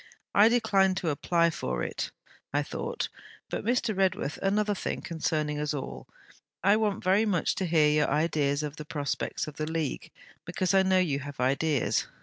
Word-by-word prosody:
'I 210 Hz, +2 st, +7 dB
declined 200 Hz, -5 st, +3 dB
to 170 Hz, -4 st, 0 dB
apply 170 Hz, +3 st, +2 dB
for 60 Hz, -, -3 dB
it. -, -, -3 dB, 0.4 s
I -, -, +1 dB
thought -, -, -3 dB, 0.4 s
But, -, -, -3 dB
Mr. 235 Hz, -1 st, +1 dB
Redworth, 185 Hz, -6 st, 0 dB
another 205 Hz, +2 st, +1 dB
thing, 195 Hz, -, -3 dB
concerning 155 Hz, -2 st, -1 dB
us 150 Hz, 0 st, -1 dB
all: 135 Hz, -, -6 dB, 0.6 s
I 200 Hz, +2 st, +5 dB
want 215 Hz, -2 st, 0 dB
very 195 Hz, +4 st, +3 dB
much 180 Hz, -5 st, +1 dB
to 190 Hz, -, -1 dB
hear 160 Hz, -2 st, +4 dB
your 150 Hz, 0 st, +2 dB
ideas 150 Hz, -1 st, +1 dB
of 150 Hz, +1 st, -5 dB
the 155 Hz, -, -6 dB
prospects 145 Hz, -3 st, -2 dB
of 150 Hz, -1 st, -9 dB
the 155 Hz, 0 st, -2 dB
League; 160 Hz, -4 st, -3 dB, 0.3 s
because 180 Hz, +2 st, -1 dB
I 195 Hz, -, +6 dB
know 190 Hz, 0 st, +3 dB
you 160 Hz, -7 st, +1 dB
have 145 Hz, -1 st, -8 dB
ideas. 140 Hz, +2 st, +1 dB
165 Hz, 175 wpm, -28 LUFS, 150-195 Hz, 0.6 s, I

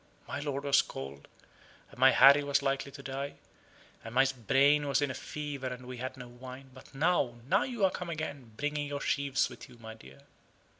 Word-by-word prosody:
My 140 Hz, -, -4 dB
lord 140 Hz, -1 st, -3 dB
was 140 Hz, -1 st, +5 dB
cold, 70 Hz, +1 st, -8 dB, 0.6 s
and -, -, -15 dB
my 130 Hz, +1 st, +8 dB
Harry 140 Hz, +3 st, +7 dB
was 140 Hz, 0 st, +1 dB
likely 135 Hz, 0 st, -1 dB
to 140 Hz, 0 st, -11 dB
die: 135 Hz, +1 st, -4 dB, 0.7 s
and 115 Hz, +1 st, -8 dB
my 135 Hz, -, +6 dB, 0.2 s
brain 145 Hz, +2 st, +4 dB
was 140 Hz, -1 st, +2 dB
in 145 Hz, -2 st, 0 dB
a -, -, -4 dB
fever; 145 Hz, -1 st, -5 dB
and 125 Hz, 0 st, -6 dB
we 125 Hz, 0 st, -7 dB
had 130 Hz, +2 st, -5 dB
no 125 Hz, -1 st, -8 dB
wine. 130 Hz, +2 st, -11 dB
But 130 Hz, +1 st, -15 dB
now 140 Hz, -5 st, +2 dB
now 195 Hz, +7 st, +3 dB
you 240 Hz, -6 st, 0 dB
are 190 Hz, -, +3 dB
come 180 Hz, -1 st, -5 dB
again, 145 Hz, -7 st, -5 dB
bringing 145 Hz, 0 st, -2 dB
your 145 Hz, 0 st, -4 dB
sheaves 140 Hz, -1 st, +1 dB
with -, -, -12 dB
you, 125 Hz, -, -15 dB
my 110 Hz, -1 st, -9 dB
dear." 70 Hz, -12 st, -15 dB
135 Hz, 205 wpm, -31 LUFS, 125-145 Hz, 0.7 s, my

